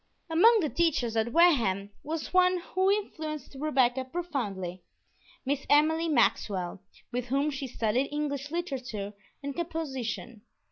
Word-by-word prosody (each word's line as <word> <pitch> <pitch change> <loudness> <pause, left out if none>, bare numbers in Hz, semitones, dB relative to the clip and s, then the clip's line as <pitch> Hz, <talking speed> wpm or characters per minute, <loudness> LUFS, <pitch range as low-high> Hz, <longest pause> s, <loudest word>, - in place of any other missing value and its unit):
Among 440 +7 +6
the 310 - 0
teachers 280 -10 +1
at 225 +1 +1
Wareham 230 - +3
was 320 +2 -4
one 365 0 +5 0.2
who 375 +1 +3
influenced 310 - -2
Rebecca 265 -4 +2
profoundly, 235 - -4 0.6
Miss 275 +1 -1
Emily 320 +3 +4
Maxwell, 200 - +1 0.3
with 245 0 -2
whom 275 +4 +1
she 270 -1 -4
studied 235 +2 0
English 290 -1 -3
literature 260 - -4 0.3
and 280 -1 -4
composition. 265 -9 -4
280 Hz, 125 wpm, -29 LUFS, 235-325 Hz, 0.6 s, Among